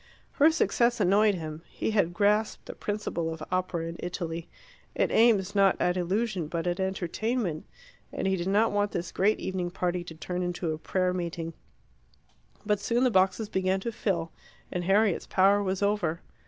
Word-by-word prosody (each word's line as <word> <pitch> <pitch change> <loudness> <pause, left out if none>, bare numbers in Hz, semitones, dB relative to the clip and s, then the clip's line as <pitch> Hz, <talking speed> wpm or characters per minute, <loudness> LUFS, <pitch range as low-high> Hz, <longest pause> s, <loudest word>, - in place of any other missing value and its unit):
Her 300 +2 +5
success 240 -6 +2
annoyed 205 +2 +4
him. 155 -2 -6
He - - -3
had 200 -6 +2
grasped 210 +3 +1
the - - -7
principle 205 -6 -3
of 160 -1 -6
opera 185 -2 -1
in 165 0 -6
Italy 170 -2 -4 0.5
it - - +1
aims 210 -4 +4
not 195 -2 +4
at 180 - +1
illusion 185 0 -1
but 165 +1 -3
at 175 +1 -1
entertainment 190 0 -2 0.4
and - - -3
he 190 0 +2
did 175 0 -3
not 210 +4 +3
want 205 0 0
this 175 - -3
great 205 +3 +2
evening 185 -2 -2
party 180 0 -2
to 160 - -9
turn 180 +3 -4
into 175 -2 -2
a 155 - -6
prayer 185 +2 0
meeting. 170 -2 -4 1.1
But 210 -1 +1
soon 235 +5 +1
the 255 - +3
boxes 190 +2 +2
began 190 -1 0
to 235 - -3
fill, 170 -7 -2 0.4
and 175 -1 -3
Harriet's 200 0 +2
power 195 +2 +4
was 190 0 -1
over. 185 -5 0
190 Hz, 175 wpm, -28 LUFS, 175-205 Hz, 1.1 s, Her